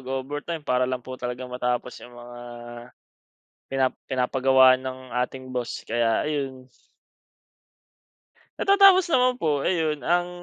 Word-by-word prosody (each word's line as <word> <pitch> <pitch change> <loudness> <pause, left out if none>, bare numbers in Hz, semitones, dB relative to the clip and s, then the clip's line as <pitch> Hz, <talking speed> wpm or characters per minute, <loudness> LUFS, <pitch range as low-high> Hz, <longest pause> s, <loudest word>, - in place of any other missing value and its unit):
mag-overtime 145 +5 -5
para 125 0 +1
lang 130 -1 -4
po 130 0 -8
talaga 125 +1 -4
matapos 125 0 -3
'yung 120 0 -13
mga, 120 0 -11 1.3
pina 135 -1 +2 0.2
pinapagawa 130 0 +4
ng 130 0 -6 0.3
ating 130 +1 -8
boss, 120 -1 -4
kaya 115 +3 +1
ayun. 135 -4 -4 1.9
Natatapos 390 -2 +6
naman 255 -1 +4
po. 150 - 0
Ayun 155 -2 0
ang 175 +6 +1
130 Hz, 115 wpm, -24 LUFS, 125-150 Hz, 1.9 s, Natatapos